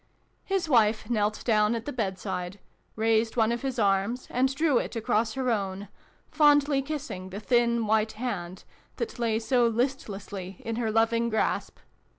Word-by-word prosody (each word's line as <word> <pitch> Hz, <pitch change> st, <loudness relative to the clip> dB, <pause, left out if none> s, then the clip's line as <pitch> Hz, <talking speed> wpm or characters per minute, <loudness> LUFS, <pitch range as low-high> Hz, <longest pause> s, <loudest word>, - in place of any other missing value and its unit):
His 385 Hz, -3 st, -1 dB
wife 225 Hz, -4 st, +2 dB
knelt 210 Hz, -2 st, 0 dB
down 215 Hz, -1 st, +3 dB
at 230 Hz, 0 st, -5 dB
the 290 Hz, -, -4 dB
bedside, 190 Hz, -4 st, -3 dB, 0.4 s
raised 225 Hz, +1 st, +1 dB
one 225 Hz, 0 st, +3 dB
of 235 Hz, -, -2 dB
his 270 Hz, -2 st, -3 dB
arms, 200 Hz, +4 st, +1 dB
and 260 Hz, +2 st, +2 dB
drew 300 Hz, -4 st, +3 dB
it -, -, -5 dB
across 225 Hz, -1 st, 0 dB
her 255 Hz, -1 st, 0 dB
own, 195 Hz, -2 st, -3 dB, 0.4 s
fondly 290 Hz, -2 st, +4 dB
kissing 265 Hz, -10 st, -5 dB
the. 195 Hz, +2 st, -6 dB
thin 235 Hz, 0 st, +2 dB
white 220 Hz, +1 st, +1 dB
hand 190 Hz, -7 st, -5 dB, 0.3 s
that 455 Hz, -, -5 dB
lay 230 Hz, -2 st, +1 dB
so 240 Hz, +1 st, +2 dB
listlessly 205 Hz, -6 st, -3 dB
in 230 Hz, 0 st, -3 dB
her 235 Hz, -2 st, -1 dB
loving 230 Hz, +1 st, +2 dB
grasp. 220 Hz, -1 st, -1 dB
225 Hz, 160 wpm, -27 LUFS, 210-250 Hz, 0.4 s, fondly